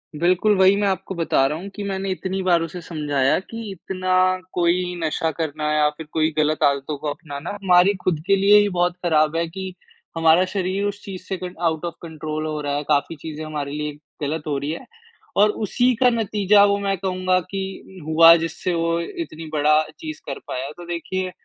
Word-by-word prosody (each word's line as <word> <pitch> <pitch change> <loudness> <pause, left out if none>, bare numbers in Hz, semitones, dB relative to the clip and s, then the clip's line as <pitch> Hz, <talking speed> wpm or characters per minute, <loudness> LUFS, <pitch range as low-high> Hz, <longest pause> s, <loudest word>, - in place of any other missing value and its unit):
बिल्कुल, 180 +6 +3
वही 190 +1 +6
मैं 205 - +2
आपको 190 0 -2
बता 165 -5 +2
रहा 150 +3 -3
हूँ 195 +3 -7
कि 205 - -5
मैंने 195 -1 -3
इतनी 190 +1 -3
बार 175 -2 +3
उसे 165 +2 -5
समझाया 145 -5 0
कि 225 +2 -8
इतना 185 0 -4 0.4
कोई 180 +1 +1
नशा 160 +1 0
करना 155 -1 -2
या 150 -1 +3
फ़िर 150 +1 -10
कोई 160 0 +2
ग़लत 155 0 +1
आदतों 140 +1 +1
को 150 - -6
अपनाना 145 +1 -6
हमारी 180 +1 +5
ख़ुद 175 -4 +1
के 195 - +5
लिए 200 +2 +6
ही 205 0 +2
बहुत 175 -1 +1
ख़राब 155 -1 +3
है 170 0 0
कि, 185 +2 -6 0.4
हमारा 165 +2 +5
शरीर 190 0 -1
उस 205 0 -3
चीज़ 190 -2 -7
से 190 - -4
कंट 180 0 -7
आउट 160 -2 0
ऑफ़ 170 - -3
कंट्रोल 155 -1 -5
हो 155 -1 -3
रहा 145 -1 -2
है 145 - -2
काफ़ी 145 +3 0
चीज़ें 155 +1 -7
हमारे 150 -2 -4
लिए 150 0 -3 0.3
ग़लत 150 +2 -2
हो 145 -2 0
रही 140 +2 -3
हैं 165 - -6 0.5
और 210 +1 +6 0.2
उसी 245 +5 +2
का 250 +2 +4
नतीजा 210 -3 +3
वो 200 0 +2
मैं 195 -1 -1
कहूँगा 185 0 0
कि 190 -1 -6
हुआ 165 +1 +8
जिससे 175 +2 -3
वो 165 0 0 0.2
इतनी 165 - -10
बड़ा 150 0 +4 0.2
चीज़ 315 -1 -7
कर 140 - -5
पाया। 130 +2 -4
तो 175 - -9
देखिए 185 +2 -3
170 Hz, 200 wpm, -22 LUFS, 155-190 Hz, 0.5 s, हुआ